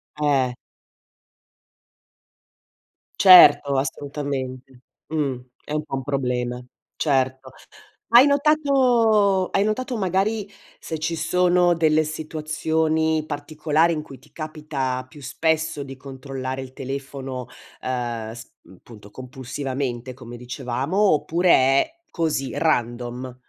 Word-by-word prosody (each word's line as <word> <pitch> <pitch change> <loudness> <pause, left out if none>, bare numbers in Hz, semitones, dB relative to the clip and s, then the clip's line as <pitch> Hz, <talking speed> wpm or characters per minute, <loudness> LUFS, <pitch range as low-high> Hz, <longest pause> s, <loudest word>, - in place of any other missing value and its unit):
Eh 140 -4 +1 2.7
Certo, 180 -6 +8
assolutamente, 135 -2 -4 0.3
mh. 145 -5 -1 0.3
È 150 - -7
un 155 0 -1
po' 145 - -5
un 135 - -4
problema, 125 -3 -2 0.3
certo. 130 -2 0 0.6
Hai 240 +4 +8
notato 250 - +3
hai 195 - +2
notato 245 +4 -2
magari 195 +2 0 0.3
se 160 - -5
ci 165 +2 -2
sono 175 +2 +3
delle 155 -2 +3
situazioni 155 0 -1
particolari 155 +2 0
in 155 -2 -2
cui 135 -3 -12
ti - - -23
capita 150 -5 -4
più 150 - -14
spesso 160 +2 -1
di 135 -1 -10
controllare 130 -1 -6
il 130 -1 -10
telefono, 135 -1 -6 0.3
uhm, 120 -3 -3
sp 115 - -12 0.3
punto 105 -3 -14
compulsivamente, 130 +1 -5
come 120 -1 -10
dicevamo, 125 +5 -4 0.2
oppure 170 +4 0
è 135 - +4 0.2
così, 155 -6 -1
random? 125 -4 -1
145 Hz, 105 wpm, -23 LUFS, 130-160 Hz, 2.7 s, Certo